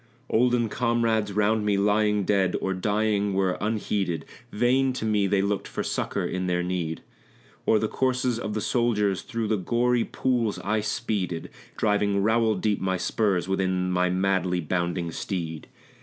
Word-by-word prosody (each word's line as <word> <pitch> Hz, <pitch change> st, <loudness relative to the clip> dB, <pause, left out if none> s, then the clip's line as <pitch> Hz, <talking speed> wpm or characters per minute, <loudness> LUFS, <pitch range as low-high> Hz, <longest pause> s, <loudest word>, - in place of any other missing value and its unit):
Olden 120 Hz, 0 st, +3 dB
comrades 115 Hz, -2 st, +1 dB
round 105 Hz, +2 st, +2 dB
me 105 Hz, -1 st, +1 dB
lying 105 Hz, 0 st, +2 dB
dead 95 Hz, -1 st, +1 dB
or 95 Hz, -, -1 dB
dying 105 Hz, +1 st, 0 dB
were 95 Hz, -1 st, +1 dB
unheeded; 100 Hz, -6 st, -1 dB, 0.3 s
Vain 130 Hz, +4 st, +2 dB
to 120 Hz, -, -4 dB
me 105 Hz, -2 st, +2 dB
they 95 Hz, 0 st, +2 dB
looked 100 Hz, 0 st, -1 dB
for -, -, -4 dB
succor -, -, -2 dB
in 95 Hz, 0 st, -2 dB
their 90 Hz, 0 st, 0 dB
need. 90 Hz, -3 st, -3 dB, 0.6 s
O'er 110 Hz, -, +5 dB
the 110 Hz, -, 0 dB
corses 125 Hz, -1 st, 0 dB
of 105 Hz, -2 st, -4 dB
the 110 Hz, -, -1 dB
soldiers, 105 Hz, -6 st, +1 dB
through 115 Hz, -1 st, -3 dB
the 110 Hz, -, +1 dB
gory 120 Hz, +5 st, +1 dB
pools 120 Hz, -5 st, -1 dB
I 110 Hz, +2 st, +1 dB
speeded, 105 Hz, -6 st, -2 dB, 0.3 s
Driving 100 Hz, -2 st, +1 dB
rowel 110 Hz, 0 st, +3 dB
deep 105 Hz, +2 st, 0 dB
my 95 Hz, 0 st, 0 dB
spurs 95 Hz, -1 st, 0 dB
within 95 Hz, -1 st, 0 dB
my 90 Hz, 0 st, +2 dB
madly 95 Hz, -1 st, +1 dB
bounding 85 Hz, +1 st, -2 dB
steed. 80 Hz, -3 st, -4 dB
105 Hz, 155 wpm, -26 LUFS, 95-110 Hz, 0.6 s, O'er